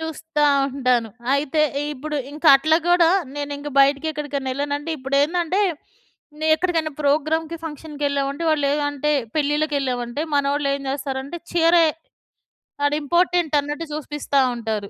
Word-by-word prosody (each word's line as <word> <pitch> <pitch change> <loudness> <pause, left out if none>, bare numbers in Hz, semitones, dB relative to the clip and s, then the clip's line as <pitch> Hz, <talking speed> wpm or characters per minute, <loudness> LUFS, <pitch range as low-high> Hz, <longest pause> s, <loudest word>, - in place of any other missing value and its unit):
చూస్తా 320 -1 -2 0.2
ఉంటాను. 255 -4 0 0.3
అయితే 300 +2 +1 0.3
ఇప్పుడు 300 +3 -5 0.2
ఇంక 300 +3 -11
అట్లా 315 +3 +2
గూడా 350 -1 +5 0.3
నేనింక 290 0 -4
బయటికెక్కడికన్నా 280 -1 0
ఎళ్ళానంటే, 290 +3 -3
ఇప్పుడేందంటే 310 +8 +1 0.8
నే 315 - -1
ఎక్కడికైనా 325 -4 -1
ప్రోగ్రామ్‌కి, 310 +3 0
ఫంక్షన్‌కి 300 -1 -6
ఎళ్ళామంటే 280 +3 -2
వాళ్ళేం 290 -1 +1
అంటే 300 +1 -1 0.2
పెళ్ళిళ్ళకెళ్ళామంటే, 285 -4 -1
మనోళ్ళు 280 0 +1
ఏం 280 - -5
జేస్తారంటే 275 +3 -4
చీరే, 335 0 +5 1.0
ఆడ 285 - +2
ఇంపార్టెంట్ 345 0 +1
అన్నట్టు 295 +3 -5
చూపిస్తా 295 -2 -1
ఉంటారు. 220 -3 -4
290 Hz, 115 wpm, -22 LUFS, 280-315 Hz, 1.0 s, గూడా